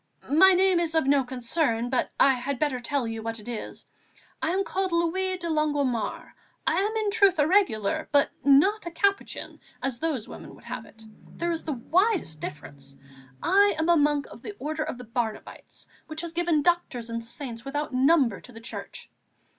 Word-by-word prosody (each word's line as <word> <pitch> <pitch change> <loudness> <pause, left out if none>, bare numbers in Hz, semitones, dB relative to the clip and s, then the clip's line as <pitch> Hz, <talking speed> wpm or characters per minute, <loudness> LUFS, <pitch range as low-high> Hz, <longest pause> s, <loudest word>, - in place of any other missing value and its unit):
My 380 +6 +7
name 370 -1 +4
is 330 -1 -1
of 320 - +3
no 275 0 +4
concern, 245 -1 -1
but 255 - +1
I 275 - +6
had 260 +2 -3
better 275 -2 0
tell 250 0 -1
you 225 0 -4
what 225 0 -4
it 210 - -13
is; 235 -3 -6 0.6
I - - 0
am 380 +3 +1
called 380 -1 -2
Louis 370 +3 0
de 345 -2 -5
Longuemare. 290 -6 -1 0.3
I - - +2
am 425 +2 -1
in 430 -2 0
truth 400 -4 +4
a 295 - +4
Regular; 290 - +1
but 285 -1 +3
not 340 +9 +4
a - - -1
Capuchin, 395 +4 -1 0.2
as 265 -3 -3
those 300 -9 -2
women - - -10
would - - -18
have - - -7
it. 220 - -16 0.3
There 345 0 -1
is 330 -1 -4
the 310 - -1
widest 330 - 0
difference; 140 -3 -8 0.5
I 405 +1 +4
am 320 +2 0
a 345 - +6
monk 295 -2 +2
of - - -12
the 415 - -7
Order 310 +2 -3
of - - -5
the 250 - -10
Barnabites, 230 -1 -5 0.2
which 310 0 -3
has 340 -1 -5
given 340 -3 +1
Doctors 260 -9 0
and 230 0 -3
Saints 235 -1 -6
without 290 +1 -3
number 260 - +3
to 250 - -14
the 225 - -11
Church. 230 - -7
295 Hz, 195 wpm, -26 LUFS, 245-345 Hz, 0.6 s, My